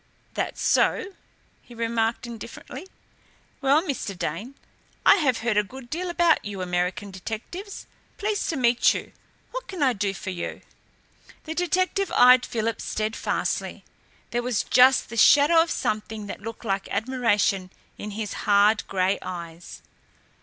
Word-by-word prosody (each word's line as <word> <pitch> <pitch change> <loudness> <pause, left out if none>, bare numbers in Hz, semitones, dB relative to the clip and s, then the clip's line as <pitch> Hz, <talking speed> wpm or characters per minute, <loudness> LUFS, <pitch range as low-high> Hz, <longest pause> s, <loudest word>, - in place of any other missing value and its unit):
"That - - -3
so?" 385 - +1 0.5
he 240 - -15
remarked 230 0 -1
indifferently. 235 - -9 0.7
"Well, 280 +4 +4
Mr. 255 - -4
Dane, 185 - -4 0.5
I - - +8
have 260 - +1
heard 225 -3 +1
a 210 - +4
good 245 +3 -12
deal 355 +3 -3
about 345 -2 +3
you 205 -2 -6
American 180 +3 -2
detectives. 225 - -7 0.3
Pleased 415 0 -1
to 325 - -1
meet 240 -1 +3
you. - - -6 0.4
What - - -6
can 365 -6 -3
I 260 -2 +4
do 200 -2 -2
for 190 - -5
you?" 175 - -5 0.8
The 320 - -5
detective 370 +3 0
eyed 250 0 +7
Philip 225 -1 -2
steadfastly. 215 +1 -2 0.5
There 240 - 0
was 245 -3 -1
just 260 +1 +5
the 230 - -7
shadow 295 +8 +6
of 330 - 0
something 215 -4 -2
that 205 - -7
looked 225 +2 -8
like 195 -2 -1
admiration 210 -5 +1 0.3
in 210 - -5
his 215 -2 -3 0.2
hard, 205 +1 +5
grey 190 0 0
eyes. 170 -1 -8
230 Hz, 145 wpm, -25 LUFS, 205-285 Hz, 0.8 s, I